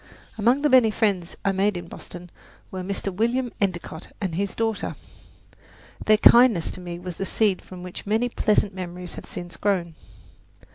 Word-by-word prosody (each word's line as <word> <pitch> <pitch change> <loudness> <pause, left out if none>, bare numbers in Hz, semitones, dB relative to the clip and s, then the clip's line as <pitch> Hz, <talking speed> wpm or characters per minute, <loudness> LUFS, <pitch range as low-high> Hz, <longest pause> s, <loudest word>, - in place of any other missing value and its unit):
Among 240 +6 +2
the 295 - +4
many 255 -4 +6
friends 200 -6 0
I 195 - +4
made 195 0 +1
in 175 -1 -7
Boston 175 0 -10 0.4
were 185 - -4
Mr. 195 +1 -3
William 235 +5 0
Endicott 175 -4 -2
and 190 -5 -2
his 195 +3 -2
daughter. 225 -2 -1 1.1
Their 215 0 +6
kindness 235 -6 +6
to 185 - -9
me 175 -1 -6
was 175 -1 -7
the 195 - -2
seed 205 -4 +1
from 180 -1 -10
which 180 +2 -8
many 220 +4 +2
pleasant 210 -3 +1
memories 180 -1 -6
have - - -9
since 175 -1 -7
grown. 185 -5 0
195 Hz, 170 wpm, -24 LUFS, 180-220 Hz, 1.1 s, many